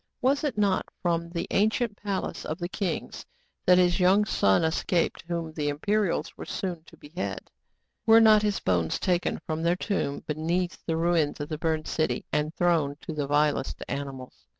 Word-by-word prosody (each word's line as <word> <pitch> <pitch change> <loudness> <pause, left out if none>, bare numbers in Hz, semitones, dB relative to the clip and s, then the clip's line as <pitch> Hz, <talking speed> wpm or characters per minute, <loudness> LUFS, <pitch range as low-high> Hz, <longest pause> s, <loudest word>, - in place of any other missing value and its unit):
Was 275 +4 +2
it 290 -7 -1
not 200 -3 +1 0.2
from 170 -1 0
the 170 0 -3
ancient 220 +2 +1
palace 200 -2 -3
of 155 - -4
the 175 -2 -3
kings 185 -1 -4 0.4
that 180 0 +7
his 180 0 +3
young 190 +3 +4
son 100 - +3
escaped, 165 +1 0
whom 170 -2 -3
the 150 -2 -1
Imperials 200 +6 0
were - - -8
soon 175 -4 -4
to - - -17
behead? 165 +5 -6 0.6
Were 225 0 +8
not 215 -2 +7
his 210 -1 0
bones 85 -3 0
taken 180 -1 0
from 155 0 -2
their 170 +1 +2
tomb 180 -7 -2
beneath 170 +4 -2
the 165 -1 0
ruins 165 -3 +1
of 145 - -5
the 155 -2 -4
burned 160 -1 -1
city, 155 - -1
and 150 +1 +1
thrown 165 -5 +2
to 160 - -6
the 145 -2 -2
vilest 145 -1 +1
animals 135 -2 -6
170 Hz, 175 wpm, -27 LUFS, 150-190 Hz, 0.6 s, Were